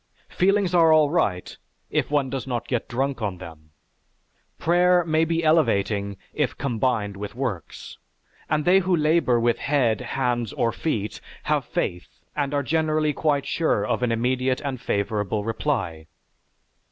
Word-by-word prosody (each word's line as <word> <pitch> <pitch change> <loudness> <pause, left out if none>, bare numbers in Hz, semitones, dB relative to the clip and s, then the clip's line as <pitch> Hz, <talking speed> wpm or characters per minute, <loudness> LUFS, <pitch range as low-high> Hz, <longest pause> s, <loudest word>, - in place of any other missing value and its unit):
Feelings 195 0 +2
are 165 -2 +5
all 155 -2 +5
right, 100 - 0 0.4
if - - 0
one 140 -3 0
does 135 -1 -4
not 120 -2 -3
get 125 -3 -2
drunk 135 +1 -2
on 100 -4 -2
them. 80 -4 -12 0.9
Prayer 175 +1 +3
may 160 0 +2
be 165 +1 -1
elevating 100 -11 +1 0.2
if - - -1
combined 115 -5 -1
with 105 +3 -7
works, 120 - -5 0.5
and 150 0 0
they 185 +2 +6
who 185 -1 +1
labor 155 -6 +2
with 120 0 +1
head, 130 -6 +1
hands, 120 -2 -1
or 115 - 0
feet 110 -10 -3 0.2
have - - 0
faith 90 0 -4 0.2
and 145 -2 -1
are 145 -1 0
generally 155 +1 +1
quite 145 -1 0
sure 155 -11 0
of 105 - -1
an 125 -2 +1
immediate 130 +3 0
and 135 -4 -4
favorable 105 0 -1
reply. 105 - -2
130 Hz, 150 wpm, -24 LUFS, 110-155 Hz, 0.9 s, they